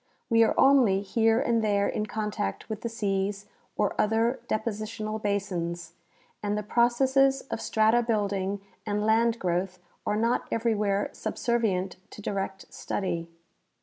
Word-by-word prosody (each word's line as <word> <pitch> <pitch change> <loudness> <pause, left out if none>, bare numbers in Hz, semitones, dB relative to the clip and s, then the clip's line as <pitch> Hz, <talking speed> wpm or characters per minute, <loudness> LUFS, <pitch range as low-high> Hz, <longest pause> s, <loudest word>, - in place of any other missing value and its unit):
We 230 0 +5
are 225 - +1
only 240 -8 +5
here 225 +3 +2
and 230 -1 +1
there 200 -1 +2
in 215 - -2
contact 210 - -3
with 220 -1 -5
the 235 - -3
seas 200 -2 -2 0.3
or 205 -2 +1
other 225 +4 +1
depositional 215 0 -3
basins, 175 -5 -2 0.5
and 205 0 -1
the 210 - -2
pro 235 +3 +4
cesses 270 +2 +3
of 225 - -3
strata 220 +2 +3
building 200 -3 -1 0.2
and 210 0 -1
land 225 +1 +3
growth 180 -1 -1 0.3
are 210 - +1
not 230 +2 +1
everywhere 210 -3 0
sub - - -4
servient 200 -6 0
to - - -12
direct 195 -2 -4
study. 170 -4 -3
210 Hz, 145 wpm, -27 LUFS, 195-230 Hz, 0.5 s, We